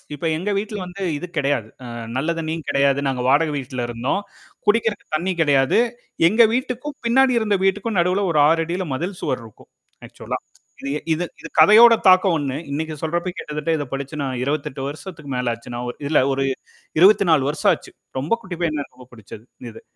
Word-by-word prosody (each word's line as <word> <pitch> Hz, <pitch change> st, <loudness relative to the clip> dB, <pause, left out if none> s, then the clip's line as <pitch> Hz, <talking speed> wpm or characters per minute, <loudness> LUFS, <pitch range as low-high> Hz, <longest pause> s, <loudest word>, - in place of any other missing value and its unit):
இப்ப 145 Hz, -, -4 dB
எங்க 190 Hz, +5 st, -2 dB
வீட்டுல 210 Hz, +1 st, -4 dB
வந்து 180 Hz, +2 st, -8 dB, 0.2 s
இது 180 Hz, -, -6 dB
கிடையாது. 140 Hz, -6 st, 0 dB, 0.2 s
அ -, -, -7 dB, 0.3 s
நல்ல 155 Hz, +6 st, 0 dB
தண்ணீயும் 160 Hz, 0 st, -4 dB
கிடையாது. 140 Hz, 0 st, +2 dB
நாங்க 125 Hz, -2 st, -2 dB
வாடக 150 Hz, +4 st, +3 dB
வீட்ல 130 Hz, -2 st, -4 dB
இருந்தோம். 120 Hz, +11 st, -1 dB, 0.5 s
குடிக்கிறக்கு 220 Hz, 0 st, +1 dB
தண்ணீ 175 Hz, +5 st, 0 dB
கெடையாது. 140 Hz, -4 st, +3 dB, 0.5 s
எங்க 220 Hz, +6 st, +5 dB
வீட்டுக்கும், 255 Hz, +3 st, -3 dB
பின்னாடி 260 Hz, +2 st, +4 dB
இருந்த 210 Hz, -3 st, +1 dB
வீட்டுக்கும் 205 Hz, +2 st, 0 dB
நடுவுல 185 Hz, +3 st, +1 dB
ஒரு 150 Hz, -, +3 dB
6'ல 165 Hz, +3 st, 0 dB
மதில் 175 Hz, +7 st, -4 dB
சுவர் 130 Hz, -, -2 dB
இருக்கும். 110 Hz, -, -17 dB, 0.4 s
ஆக்ச்சுவலா. -, -, -6 dB, 0.4 s
இது 140 Hz, -, -4 dB, 0.2 s
இது 165 Hz, +3 st, 0 dB, 0.2 s
இது 165 Hz, -, -8 dB
கதையோட 225 Hz, +8 st, +8 dB
தாக்கம் 185 Hz, -1 st, +5 dB
ஒண்ணு. 140 Hz, -3 st, -2 dB
இன்னைக்கு 155 Hz, +2 st, -3 dB
சொல்றப்ப, 175 Hz, +3 st, -1 dB
கிட்டத்தட்ட 150 Hz, +1 st, -4 dB
இத 145 Hz, -, -2 dB
படிச்சு 135 Hz, +2 st, -4 dB
நான் 130 Hz, -2 st, -3 dB
28 140 Hz, -2 st, -3 dB
வருஷத்துக்கு 150 Hz, -1 st, -9 dB
மேல 125 Hz, -1 st, 0 dB
ஆச்சு. 115 Hz, +2 st, -13 dB, 0.4 s
இல்ல 155 Hz, -, +4 dB
ஒரு 135 Hz, 0 st, 0 dB, 0.6 s
24 185 Hz, -6 st, +5 dB
வருஷம் 150 Hz, -, +2 dB
ஆச்சு. -, -, -6 dB, 0.3 s
ரொம்ப 140 Hz, +8 st, -3 dB
குட்டிப்பையனா 170 Hz, -6 st, -2 dB
இருக்கப்ப 125 Hz, -2 st, -17 dB
புடிச்சது 110 Hz, -1 st, -12 dB, 0.3 s
இது. 110 Hz, -, -13 dB
160 Hz, 165 wpm, -21 LUFS, 140-190 Hz, 0.6 s, கதையோட